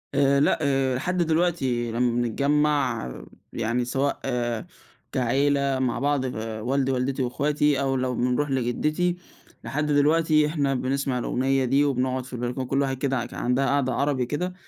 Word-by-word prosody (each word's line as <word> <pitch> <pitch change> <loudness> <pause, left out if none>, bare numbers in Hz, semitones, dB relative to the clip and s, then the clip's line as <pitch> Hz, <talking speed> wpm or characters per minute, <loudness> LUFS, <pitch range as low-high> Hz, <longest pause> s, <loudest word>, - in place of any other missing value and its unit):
آآ، 140 0 +4
لأ 145 - +3
آآ، 135 -3 +1
لحد 180 +8 -2
دلوقتي 160 -8 +1
لمَّا 120 +1 +1
بنتجمَّع 140 - +1 0.4
يعني 120 +2 -1
سواء 135 +3 -1 0.9
كعيلة 135 +2 +1
مع 125 -2 0
بعض 145 0 +1
والدي 115 +5 -1
ووالدتي 130 +1 -1
واخواتي 145 +2 +1
أو 135 -1 0
لو 130 -1 -1
بنروح 125 +4 0
لجدتي، 150 +8 0 0.5
لحد 150 +2 -2
دلوقتي 155 +1 +3
إحنا 145 -3 0
بنسمع 130 0 -1
الأغنية 135 +2 0
دي، 135 +3 +3
وبنقعد 130 -2 0
في 130 - -12
البلكونة 125 +2 -3
كل 135 +2 +1
واحد 135 -1 -1
كده 130 -2 -1
كان - - -8
عندها 125 +3 +1
قعدة 135 -2 +1
عربي 140 -1 0
كده، 175 +8 -3
135 Hz, 145 wpm, -25 LUFS, 125-145 Hz, 0.9 s, آآ